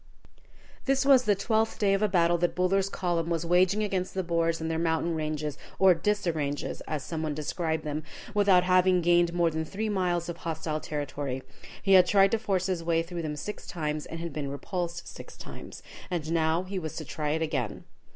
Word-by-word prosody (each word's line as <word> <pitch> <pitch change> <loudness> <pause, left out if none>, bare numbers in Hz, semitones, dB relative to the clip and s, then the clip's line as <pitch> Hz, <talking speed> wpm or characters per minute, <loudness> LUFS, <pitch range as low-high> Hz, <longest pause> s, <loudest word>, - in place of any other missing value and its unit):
This 270 0 +2
was 265 -3 +6
the 205 - +4
twelfth 220 +2 0
day 200 -2 +2
of 195 - +1
a 215 - +4
battle 175 -2 +3
that 175 0 0
Buller's 190 +2 +2
column 170 -3 -1
was 170 -1 -1
waging 185 +4 +3
against 190 -3 -2
the 190 - 0
Boers 165 -1 0
and 160 - -3
their 160 - -1
mountain 165 0 0
ranges, 155 -2 -3 0.2
or 190 -1 +6
"disarranges," 165 -6 -1
as 150 -3 -3
some 160 +3 -4
one 155 -2 -2
described 160 +1 -2
them, 150 0 -3 0.3
without 200 -3 +5
having 185 0 +4
gained 175 0 +4
more 170 -1 +2
than 160 0 -2
three 210 +7 -3
miles 180 -4 0
of 170 -1 -5
hostile 160 -2 -3
territory. 140 -3 -4 0.4
He 195 - +4
had 180 -1 +7
tried 195 0 +5
to 225 - +1
force 195 -4 0
his 185 -3 -1
way 165 0 +1
through 170 0 -5
them 155 -2 -3
six 210 +8 -6
times, 150 -3 -3
and 165 - -6
had 170 -2 -5
been 145 -2 -3
repulsed 175 +4 -4
six - - -10
times. - - -10 0.3
And 165 -4 -3
now 165 +1 +2
he 190 +1 -4
was 160 -3 -6
to 155 - -5
try 150 +1 -2
it 160 +1 0
again. 135 -9 -2
170 Hz, 205 wpm, -28 LUFS, 160-185 Hz, 0.4 s, had